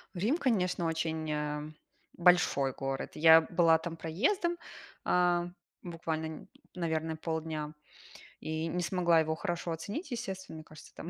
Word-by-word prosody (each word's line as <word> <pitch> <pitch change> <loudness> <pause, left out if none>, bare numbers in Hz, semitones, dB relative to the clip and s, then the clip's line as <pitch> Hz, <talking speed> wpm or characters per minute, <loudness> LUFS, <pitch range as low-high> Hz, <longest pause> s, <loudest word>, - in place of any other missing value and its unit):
Рим, 220 - +1
конечно, 185 - +1
очень, 160 -1 -2
э, 150 0 -3 0.5
большой 170 -6 +4
город. 135 0 -4
Я 160 +1 +8
была 165 -1 +4
там 165 0 -6
проездом, 340 - 0 0.5
а, 175 -1 +2 0.3
буквально, 165 -2 -3
не 160 - -9 0.3
наверное, 160 -2 -2
полдня, 160 -2 -3 0.7
и 160 +1 -3
не 180 +2 -2
смогла 175 -2 +3
его 160 0 0
хорошо 175 -1 -3
оценить. 205 - -5
Естественно, 190 -8 -5
мне 155 - -9
кажется, 155 -1 -15
там 170 - -7
165 Hz, 135 wpm, -31 LUFS, 160-180 Hz, 0.7 s, Я